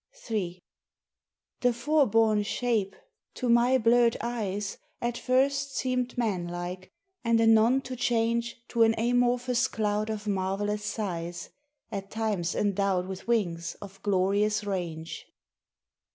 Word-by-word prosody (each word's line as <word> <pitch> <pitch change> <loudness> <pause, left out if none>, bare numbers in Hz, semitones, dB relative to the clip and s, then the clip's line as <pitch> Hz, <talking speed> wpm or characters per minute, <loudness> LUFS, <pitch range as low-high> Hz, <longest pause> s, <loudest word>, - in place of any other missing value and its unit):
III 180 -4 -2 1.0
The 245 -1 +3
fore 285 +4 +2
borne 220 -1 +3
shape, 210 -2 -1 0.4
to 255 - -2
my 240 +2 +5
blurred 235 0 +4
eyes, 210 -4 -3 0.2
At 240 0 -2
first 275 +2 +1
seemed 250 -1 -1
man 200 -8 0
like, 175 +1 -6 0.3
and 230 -1 +3
anon 225 +3 +5
to 255 -1 -6
change 235 -1 0
To 235 - 0
an 225 0 +5
amorphous 245 +1 +2
cloud 210 0 -1
of 215 -1 -4
marvellous 205 +1 -1
size, 175 -5 -4 0.4
At 195 -1 -5
times 210 -6 -1
endowed 195 -2 +1
with 190 +2 -7
wings 175 -8 0
of 195 -1 -12
glorious 205 +2 +1
range. 170 -5 -4
215 Hz, 125 wpm, -28 LUFS, 195-240 Hz, 1.0 s, my